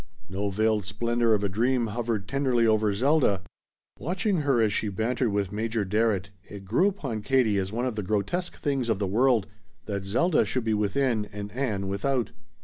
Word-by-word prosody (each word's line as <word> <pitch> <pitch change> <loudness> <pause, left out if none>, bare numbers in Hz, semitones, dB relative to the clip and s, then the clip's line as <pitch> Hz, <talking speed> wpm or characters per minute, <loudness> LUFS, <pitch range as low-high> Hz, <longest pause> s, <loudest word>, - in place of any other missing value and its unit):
No 100 +2 -2
veiled 110 +1 +1
splendor 115 +3 +1
of 105 - -2
a - - +2
dream 120 +5 +1
hovered 115 -3 -2
tenderly 130 -3 +1
over 110 -1 +3
Zelda. 125 - +2 0.6
Watching 185 - 0
her 140 -5 +2
as 110 -2 +2
she 110 - 0
bantered 115 +4 0
with 100 -2 -1
Major 110 0 -1
Barrett 100 -1 0 0.2
it 100 -1 -9
grew 120 - +3
upon 135 - -3
Katie 110 -3 +2
as 95 0 -3
one 120 +3 -1
of 125 -4 -2
the 105 - -2
grotesque 110 - -2
things 135 -5 -1
of 110 - +2
the 100 - -1
world 115 +2 +3 0.4
that 100 -2 -3
Zelda 150 - +2
should 130 - -2
be 110 -1 0
within 110 +2 +1
and 105 0 -7
Ann 110 -6 -2
without. 120 +6 -1
110 Hz, 185 wpm, -27 LUFS, 100-130 Hz, 0.6 s, over